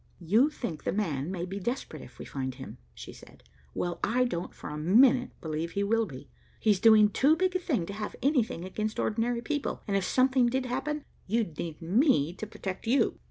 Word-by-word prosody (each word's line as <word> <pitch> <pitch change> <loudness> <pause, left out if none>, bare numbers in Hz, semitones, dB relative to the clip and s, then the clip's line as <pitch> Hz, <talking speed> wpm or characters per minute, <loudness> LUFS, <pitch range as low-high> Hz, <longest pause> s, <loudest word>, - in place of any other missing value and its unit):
"You 220 - +4
think 235 - -6
'the - - -1
man' 160 -8 -1
may 180 -2 -3
be 195 +2 -5
desperate 240 +7 -4
if - - -14
we - - -8
find 130 -2 -4
him," 130 -2 -10 0.2
she - - -9
said. - - -16 0.3
"Well, 175 -1 -2
I 245 +4 +2
don't 175 -8 -3
for - - -9
a - - -5
minute 245 - +5
believe 160 +1 -3
he 200 - 0
will 225 +2 +1
be. 130 -5 -10 0.3
He's 210 -4 +3
doing 215 -1 +7
too 285 +9 +4
big 370 +1 0
a - - +2
thing 270 - -1
to 200 - -6
have 210 +1 -5
anything 245 - +1
against 215 +3 -3
ordinary 235 +2 0
people, 295 0 -3
and 200 - 0
if 195 - +1
something 255 -1 +3
did 260 +2 0
happen, 295 +4 -3 0.2
you'd 215 -6 0
need 165 -1 -5
me 180 - +3
to 215 - -5
protect 200 -2 -6
you." 265 +4 +2
215 Hz, 205 wpm, -29 LUFS, 175-255 Hz, 0.3 s, doing